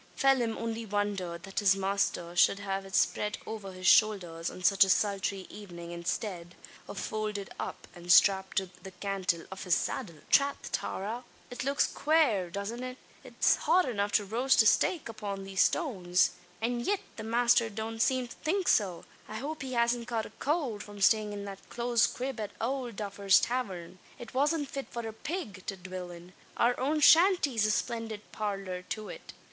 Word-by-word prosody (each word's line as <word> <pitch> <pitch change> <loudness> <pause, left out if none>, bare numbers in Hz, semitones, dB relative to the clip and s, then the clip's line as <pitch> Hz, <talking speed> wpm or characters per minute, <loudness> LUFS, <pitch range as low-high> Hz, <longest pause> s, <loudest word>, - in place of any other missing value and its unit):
Phelim 255 -5 +2
only 230 0 -3
wondered, 200 -5 -2
that 195 +1 -3
his 195 -2 +4
master 195 -3 -1
should 185 - +5
have 195 -1 -4
it 190 - -5
spread 210 0 +1
over 210 -3 -6
his 185 0 -9
shoulders 180 -6 +3
on 185 - -10
such 195 +2 +6
a 190 - 0
sultry 195 -1 +1
evening 175 -5 -9
instead 175 0 -4 0.3
of - - -8
folded 210 -2 -3
up, - - -6
and 175 0 -3
strapped 190 +1 +5
to 190 -2 0
the 190 - -8
cantle 185 -2 -2
of 190 - -6
his 180 -3 +3
saddle! 185 -10 -3 0.2
"Trath, 280 0 +2
Tara! 220 +6 -3 0.3
it 245 - -4
looks 275 +1 +2
quare, 280 - +2
doesn't 200 +6 -5
it? 255 0 -6 0.3
It's - - +2
hot 365 -3 +3
enough 205 -4 -1
to 205 - +3
roast 240 +4 +3
a - - -4
stake 315 - +3
upon 205 -3 -5
these 195 -1 0
stones; 185 - +2 0.3
an 240 +1 0
yit 400 +11 0 0.2
the 220 - -5
masther 235 0 +3
don't 220 +1 -5
seem 255 0 +2
to - - -11
think 365 +4 -1
so. 190 -5 +2 0.2
I 215 - -8
hope 295 +7 -5
he 260 -1 -5
hasn't 235 0 +1
caught 225 -2 -2
a - - -11
cowld 275 -9 -1
from 205 0 -10
stayin' 210 +1 +3
in 200 -1 -6
that 195 -1 -10
close 235 -1 +2
crib 255 -1 -4
at 210 -2 -3
owld 245 -1 -2
Duffer's 200 -1 +3
tavern. 185 -8 -3 0.2
It 240 -2 -10
wasn't 290 +3 +1
fit 275 0 -6
for 235 -1 -5
a 220 - -6
pig 220 - -5
to 195 - -3
dwill 185 0 -7
in. 175 +1 -12 0.2
Our 240 +1 +4
own 300 +4 0
shanty's 300 - +5
a - - 0
splindid 225 -1 -2
parlour 195 -3 -3
to 215 -1 -4
it." - - -10
210 Hz, 185 wpm, -30 LUFS, 190-245 Hz, 0.3 s, such